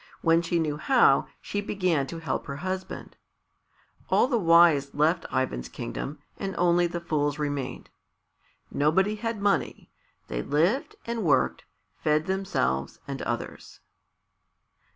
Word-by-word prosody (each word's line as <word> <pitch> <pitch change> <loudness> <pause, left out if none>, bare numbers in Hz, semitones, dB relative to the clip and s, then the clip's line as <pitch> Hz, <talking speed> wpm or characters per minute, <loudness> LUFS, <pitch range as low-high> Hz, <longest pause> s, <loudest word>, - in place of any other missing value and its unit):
When 165 0 +4
she 170 0 -1
knew 155 -3 -1
how, 230 - +4
she 205 - -3
began 180 -9 0
to 165 - -6
help 165 -1 -3
her 140 - -4
husband. 185 +5 -5 0.9
All - - +4
the 245 -4 +1
wise 165 -6 +5
left 160 +4 +2
Ivan's 60 - -1
kingdom, 145 - -5 0.2
and 195 -2 -3
only 175 0 +3
the 170 0 -4
fools 145 -4 -1
remained. 145 -3 -4 0.8
Nobody 185 +8 +2
had 230 0 -3
money. 200 0 -1 0.4
They - - -3
lived 185 - +1
and 230 -1 -3
worked, 140 -6 +2 0.3
fed 155 +1 +1
themselves 185 - -1
and - - -5
others. - - -5
165 Hz, 130 wpm, -27 LUFS, 145-190 Hz, 0.9 s, wise